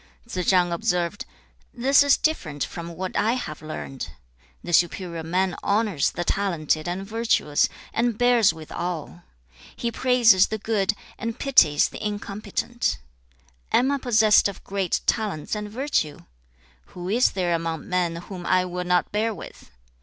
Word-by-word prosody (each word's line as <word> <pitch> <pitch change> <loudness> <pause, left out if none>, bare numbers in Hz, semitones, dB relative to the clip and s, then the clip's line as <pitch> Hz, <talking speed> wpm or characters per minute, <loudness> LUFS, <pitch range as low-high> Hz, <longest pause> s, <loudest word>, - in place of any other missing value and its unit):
"' - - -32
Tsze 185 -6 -3
chang 180 -2 +4
observed, 180 -1 -1 0.5
'This 270 +4 +4
is 285 -1 +5
different 155 - -1
from 170 0 -7
what 185 +2 -5
I 215 +3 +2
have 155 -13 -5
learned. 135 - -6 0.5
The 175 - -5
superior 175 -1 +1
man 180 +3 0
honours 205 -7 +1
the 175 - -4
talented 170 -5 0
and 180 +3 -3
virtuous, 220 -9 +1 0.2
and 235 -1 0
bears 245 -3 +4
with 160 -1 -11
all. 175 -1 -4 0.5
He 235 - -2
praises 235 -7 +5
the 220 - -3
good, 215 -1 0 0.3
and 230 0 -4
pities 200 - +4
the - - -8
incompetent. 210 +3 -2 0.7
Am 265 +3 +3
I 280 - 0
possessed 220 -5 +4
of 200 -2 -8
great 195 -3 -1
talents 210 -10 -1
and 210 -1 -3
virtue? 215 - -1 0.6
who 180 0 -8
is 235 +6 +3
there 180 -2 0
among 165 -2 -3
men 180 -2 0
whom 175 +1 -8
I 185 0 +3
will 180 0 -4
not 180 0 +1
bear 220 +1 0
with? - - -11
195 Hz, 155 wpm, -24 LUFS, 175-225 Hz, 0.7 s, is